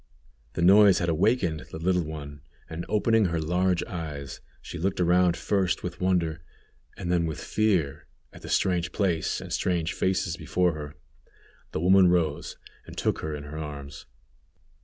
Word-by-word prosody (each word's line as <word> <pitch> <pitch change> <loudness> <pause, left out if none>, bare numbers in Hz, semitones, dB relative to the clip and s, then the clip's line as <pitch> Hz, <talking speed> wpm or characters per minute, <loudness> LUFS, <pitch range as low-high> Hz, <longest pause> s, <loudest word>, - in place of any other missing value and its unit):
The 85 - -1
noise 100 0 +7
had 85 - 0
awakened 85 -1 +1
the - - -7
little 90 +2 +1
one, 75 -2 -7 0.3
and 80 +1 -6
opening 110 0 +3
her 85 -2 0
large 90 +3 +1
eyes, 75 -6 -6 0.2
she 85 - -8
looked 95 +3 -1
around 90 0 +3
first 95 -4 0
with 90 0 -6
wonder, 85 -4 +1 0.6
and 85 - -3
then 85 -2 +2
with 80 - -5
fear, 95 -10 0 0.3
at - - -13
the - - -9
strange 90 -2 +1
place 90 -6 0
and - - -7
strange 85 -2 0
faces 95 -3 0
before 90 -2 +1
her. 75 -1 -7 0.8
The - - -3
woman 95 +1 +6
rose 85 -4 0 0.3
and - - -11
took - - 0
her 80 -1 -4
in 75 - -7
her 75 +2 -7
arms. 70 -2 -8
85 Hz, 160 wpm, -27 LUFS, 80-90 Hz, 0.8 s, noise